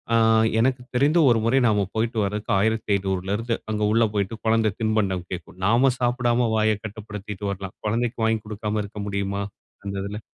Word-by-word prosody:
ஆங் 110 0 +4
எனக்கு 125 +1 +2
தெரிந்து 145 +6 +4
ஒரு 115 - +4
முறை 125 +4 +3
நாம் 105 -2 +3 0.2
போயிட்டு 115 +1 -1
வருவதற்கு 105 +2 -3
1,500 100 +1 0
அங்கு 105 -1 -1
உள்ள 115 +1 +4
போய்ட்டு 100 +2 -1
கொழந்த 110 -1 +3
தின்பண்டம் 100 -5 0
கேட்கும். 90 0 -7
நாம 125 +5 +4
சாப்பிடாம 120 -1 +1
வாயக் 110 -1 +1
கட்டுப்படுத்திட்டு 105 -1 -7
வரலாம். 95 -1 -5
குழந்தைக்கு 115 +2 -1
வாங்கிக் 110 -1 +1
கொடுக்காம 105 0 -2
இருக்க 100 0 -7
முடியுமா? 100 0 -2 0.4
அந்த 100 0 -4
இதுல. 105 +2 -5
110 Hz, 155 wpm, -24 LUFS, 100-115 Hz, 0.4 s, ஆங்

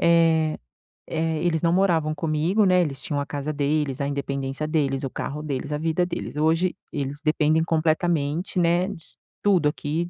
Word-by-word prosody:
eh 165 -2 +3 0.5
eh, 160 -1 -1
eles 165 -3 +1
não 170 0 +3
moravam 165 -5 +2
comigo, 165 +7 +1
né, 180 -1 +4
eles 140 -5 -2
tinham 145 -1 -2
a 140 - -2
casa 145 +1 -4
deles, 145 -1 0
a 140 - 0
independência 140 +1 -3
deles, 140 -4 0
o 135 - -2
carro 150 +4 -5
deles, 145 -1 -3
a 150 - 0
vida 165 +3 0
deles, 170 -3 -5
hoje 165 +4 +2 0.2
eles 145 0 -3
dependem 155 +1 +2
completamente, 165 +1 0
né, 175 +2 +3
d 200 - -6 0.5
Tudo 180 -7 +4
aqui 160 +3 -3
155 Hz, 170 wpm, -24 LUFS, 145-170 Hz, 0.5 s, né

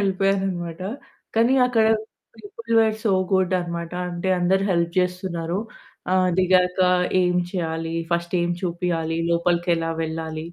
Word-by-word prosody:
యెళ్ళిపోయాననమాట. 190 -3 -1 0.5
కానీ 230 +3 +4
అక్కడ 230 -3 +2 0.5
people 225 +2 -8
were 220 -1 +2
so 210 - +3 0.2
good 190 -1 +2
అనమాట. 170 0 -5 0.2
అంటే 175 +2 -3
అందరు 190 +2 +2
హెల్ప్ 170 -1 +1
జేస్తున్నారు. 180 -1 -1 0.5
ఆహ్, 185 -1 +3
దిగాక 180 0 +3 0.4
ఏమి 180 0 +2
చేయాలి 165 -2 -3 0.2
ఫస్ట్ 170 +1 -1
ఏమి 175 0 0
చూపియాలి, 170 -2 -1
లోపలికి 170 +1 +1
ఎలా 165 0 -2
వెళ్ళాలి, 160 0 -4
180 Hz, 125 wpm, -23 LUFS, 170-190 Hz, 0.5 s, కానీ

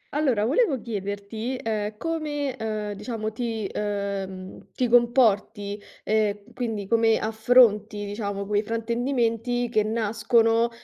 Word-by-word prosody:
Allora 255 -9 +2
volevo 290 - +2
chiederti, 210 +3 -4
ehm, 215 -3 -3
come, 295 -3 -2
ehm, 215 -3 -3
diciamo, 220 0 -4
ti 225 -2 -3
ehm, 200 -2 -4
ti 250 - +1
comporti, 225 -4 +2 0.2
e 210 -1 +1
quindi 225 -5 -3
come 225 +1 +3
affronti, 220 -2 +3
diciamo, 200 -1 -4
quei 205 +1 +1
fraintendimenti 235 +1 -1
che 220 -2 +2
nascono, 225 +1 +2
220 Hz, 110 wpm, -25 LUFS, 205-240 Hz, 0.2 s, come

